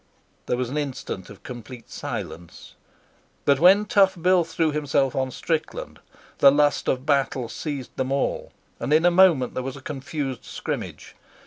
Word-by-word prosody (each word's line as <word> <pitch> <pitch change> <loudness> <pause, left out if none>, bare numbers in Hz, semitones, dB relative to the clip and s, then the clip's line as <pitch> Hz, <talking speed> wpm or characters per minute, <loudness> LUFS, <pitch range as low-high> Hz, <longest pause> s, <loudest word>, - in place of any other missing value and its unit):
There 125 - 0
was 125 -1 -2
an 150 - -1
instant 130 -9 -5
of 100 - -13
complete 120 -1 -10
silence, 85 0 -7 0.7
but 140 -1 +4
when 195 +5 +6
Tough 195 -3 +3
Bill 180 +1 +4
threw 165 -1 0
himself 145 -3 0
on 130 -1 0
Strickland 165 - -3 0.4
the 140 - +8
lust 145 +1 +2
of 130 +1 0
battle 135 -4 +1
seized 140 +1 -6
them 130 0 -1
all, 140 0 -1 0.3
and - - -3
in 160 +2 +4
a 175 - +6
moment 175 -8 +4
there - - -2
was 135 +1 -5
a - - -9
confused 135 -1 -5
scrimmage. - - -6
140 Hz, 160 wpm, -24 LUFS, 130-160 Hz, 0.7 s, the